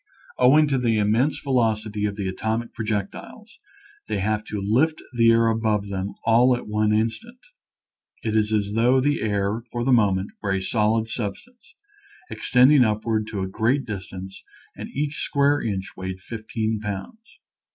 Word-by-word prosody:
Owing 145 +5 +6
to 135 -2 +1
the 115 -3 +1
immense 110 +8 +2
velocity 110 -5 0
of 100 - -4
the 100 -2 -3
atomic 110 +5 -3
projectiles, 105 -3 -5 0.5
they 110 - -2
have 105 +2 -1
to 105 - -4
lift 125 +11 +1 0.2
the 115 -1 +5
air 115 0 +4
above 110 -2 +1 0.4
all 120 +3 +5
at - - -9
one 105 0 +1
instant. 115 - -1 0.9
It 110 -1 -1
is 110 0 +2
as 105 -1 0
though 120 +4 +3
the 145 +3 +1
air 105 +1 -1
for 120 0 -2
the 135 - +2
moment 100 -4 +2
were 100 -2 -1
a 95 - 0
solid 110 +3 +1
substance, 220 - -7 0.6
ex - - -6
tending 130 +2 +6
upward 110 0 0
to 105 -3 -4
a 95 - -2
great 120 +8 0
distance, 95 -2 -7 0.3
and - - -7
each 145 +1 -3
square 140 +1 +2
inch 95 -4 -3
weighed 95 0 -6
15 110 +1 -3
pounds. 110 - -7
110 Hz, 160 wpm, -23 LUFS, 105-125 Hz, 0.9 s, Owing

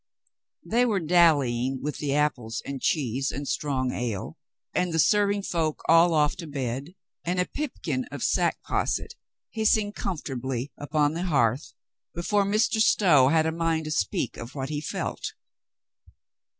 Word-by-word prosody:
They 240 +2 +2
were 220 -5 +1
dallying 145 -7 +3
with 150 +1 -3
the 140 -2 -1
apples 130 -7 -1
and 140 -2 -5
cheese 135 -2 0
and 140 +1 -5
strong 130 -4 -1
ale, 115 -6 -4 0.4
and 180 -1 0
the 160 - -1
serving 200 +5 +3
folk 160 -5 -1
all 165 +1 +5
off 150 -1 +2
to 170 -2 -7
bed, 135 +3 -4 0.3
and 180 +2 -1
a 180 - +2
pipkin 260 -2 -3
of - - -7
sack - - +1
posset - - -1 0.4
hissing 215 -1 +2
comfortably 135 - -4
upon 145 0 0
the 170 +3 -3
hearth, 130 -5 +1 0.4
be 170 - -4
fore 205 +2 +2
Mr. 215 +2 +1
Stow 170 -11 +5
had 160 +2 +3
a 160 - +1
mind 165 -1 -1
to 155 - -4
speak 100 -10 -1
of 115 +5 -8
what 135 -1 -4
he 150 -1 -3
felt. 150 - -4
155 Hz, 155 wpm, -26 LUFS, 135-180 Hz, 0.4 s, all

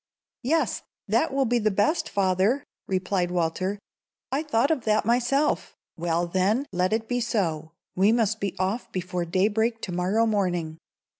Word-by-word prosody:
"Yes; 290 -1 +1 0.3
that 230 +10 +2
will 270 0 +1
be 240 0 +2
the 215 -1 +2
best, 210 - +1
father," 195 +7 +2 0.2
replied 185 -1 0
Walter. 180 +3 -1 0.5
"I 275 +3 +1
thought 280 -2 +1
of 285 -7 0
that 215 -1 +2
myself." 245 +5 +1 0.2
"Well, 170 +1 0
then, 190 +9 +1
let 180 +1 +1
it 220 0 0
be 245 +1 0
so. 165 -9 -1 0.2
We 195 +3 +4
must 220 -2 +1
be 200 -1 -2
off 190 +6 -2
before 180 -1 -3
daybreak 220 +6 +1
to 185 - -4
morrow 185 +6 +1
morning." 175 -7 -1
205 Hz, 155 wpm, -26 LUFS, 180-235 Hz, 0.5 s, We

